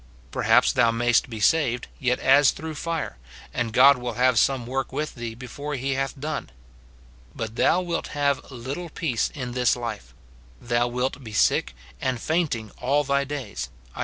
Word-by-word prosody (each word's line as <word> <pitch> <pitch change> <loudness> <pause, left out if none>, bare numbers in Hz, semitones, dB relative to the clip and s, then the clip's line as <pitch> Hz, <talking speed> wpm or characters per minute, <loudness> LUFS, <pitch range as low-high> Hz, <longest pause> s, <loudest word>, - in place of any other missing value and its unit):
Perhaps - - +4
thou 120 -2 +4
mayst 120 +2 +2
be 110 -2 -6
saved, 125 0 +2
yet 125 -1 +1
as 135 +1 +5
through 160 0 -4
fire, 160 - -4 0.3
and 120 -2 -1
God 135 +3 +7
will 120 -1 -4
have 125 0 +3
some 130 -3 +2
work 135 +2 -2
with 150 +3 -3
thee 115 -1 -6
before 140 +4 -6
he 135 +1 -1
hath 135 +1 -2
done; 150 - -4 0.9
but 110 0 -5
thou 175 +8 +3
wilt 170 -1 -2
have 140 -1 0
little 135 +7 -6
peace 150 -8 -1
in 125 -4 -4
this 125 -1 +2
life, 110 - -6 0.2
— - - -26
thou 120 - +1
wilt 125 +3 -2
be 110 -3 -9
sick 100 - +2 0.3
and 130 -2 -1
fainting 145 - -1
all 140 +4 +2
thy 140 0 +1
days, 125 - -5 0.2
Isa. - - -11
130 Hz, 175 wpm, -25 LUFS, 120-145 Hz, 0.9 s, God